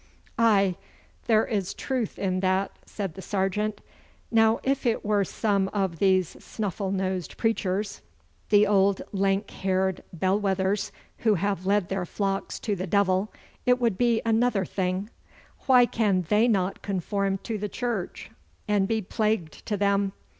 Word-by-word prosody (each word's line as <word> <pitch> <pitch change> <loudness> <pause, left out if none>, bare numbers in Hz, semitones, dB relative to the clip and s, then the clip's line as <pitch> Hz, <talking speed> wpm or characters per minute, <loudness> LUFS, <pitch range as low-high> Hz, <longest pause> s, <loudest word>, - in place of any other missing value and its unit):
'Aye, 200 -5 +4 0.5
there 220 -2 +4
is 200 -5 -2
truth 255 -6 -2
in 185 -2 -1
that,' 185 +1 0
said 195 -5 -4
the 190 - -9
sergeant. 205 +2 -1 0.5
'Now 225 0 +4
if 275 0 0
it 225 - 0
were 205 -1 +2
some 200 0 0
of 190 -5 -1
these 185 -3 +3
snuffle 200 -2 -3
nosed 190 -3 -2
preachers, 205 -3 -1 0.5
the 205 0 +6
old 200 -1 +3
lank 195 +1 0
haired 190 0 0
bell 185 +4 +1
wethers 195 +1 0 0.3
who 220 -2 +3
have 195 0 -1
led 200 -2 +2
their 190 -2 -2
flocks 195 0 -2
to 210 -3 -1
the 185 +1 -4
devil, 195 +1 +2 0.4
it 250 0 +4
would 230 -6 0
be 235 -2 +2
another 225 -3 +2
thing. 185 +4 -2 0.6
Why 250 -2 +7
can 200 -6 +1
they 215 +3 +4
not 195 -4 0
conform 195 +1 -1
to 220 -3 -3
the 210 +1 -3
Church, 230 -3 -4 0.4
and 205 -2 +2
be 220 -1 0
plagued 210 -5 -1
to 210 - 0
them? 200 -1 +1
200 Hz, 150 wpm, -26 LUFS, 190-215 Hz, 0.6 s, Why